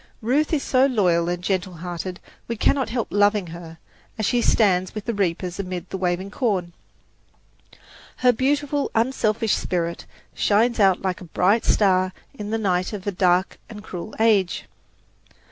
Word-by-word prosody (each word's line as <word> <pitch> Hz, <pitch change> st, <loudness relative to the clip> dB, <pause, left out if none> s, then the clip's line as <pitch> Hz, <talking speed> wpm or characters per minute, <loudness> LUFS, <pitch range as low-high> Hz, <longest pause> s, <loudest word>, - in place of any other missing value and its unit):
Ruth 280 Hz, +7 st, +1 dB
is 310 Hz, -4 st, +1 dB
so 260 Hz, +1 st, +3 dB
loyal 175 Hz, -9 st, +2 dB
and 175 Hz, 0 st, -3 dB
gentle 185 Hz, -1 st, -1 dB
hearted, 175 Hz, +1 st, -6 dB, 0.3 s
we 235 Hz, -, -2 dB
cannot 265 Hz, +4 st, +1 dB
help 235 Hz, -1 st, -2 dB
loving 205 Hz, -1 st, +3 dB
her, 165 Hz, -1 st, -10 dB, 0.4 s
as 215 Hz, -, -1 dB
she 240 Hz, +3 st, +2 dB
stands 185 Hz, -5 st, +2 dB
with 215 Hz, -, -5 dB
the 235 Hz, -, -1 dB
reapers 180 Hz, -2 st, -2 dB
amid 185 Hz, -2 st, -5 dB
the -, -, -3 dB
waving 180 Hz, +2 st, -1 dB
corn. 195 Hz, -9 st, -1 dB, 1.4 s
Her 250 Hz, -1 st, +3 dB
beautiful, 285 Hz, +3 st, 0 dB
unselfish 225 Hz, -2 st, +1 dB
spirit 170 Hz, -1 st, -2 dB, 0.3 s
shines 225 Hz, +3 st, +2 dB
out 195 Hz, -3 st, +4 dB
like 185 Hz, -2 st, -2 dB
a -, -, -8 dB
bright 190 Hz, +6 st, +2 dB
star 185 Hz, -2 st, +3 dB, 0.2 s
in 210 Hz, -6 st, -7 dB
the 225 Hz, -, 0 dB
night 185 Hz, -3 st, 0 dB
of 200 Hz, -3 st, -6 dB
a 205 Hz, -, 0 dB
dark 180 Hz, 0 st, +1 dB
and 210 Hz, -2 st, -9 dB
cruel 185 Hz, +1 st, -7 dB
age. 205 Hz, -6 st, +2 dB
200 Hz, 160 wpm, -23 LUFS, 180-225 Hz, 1.4 s, out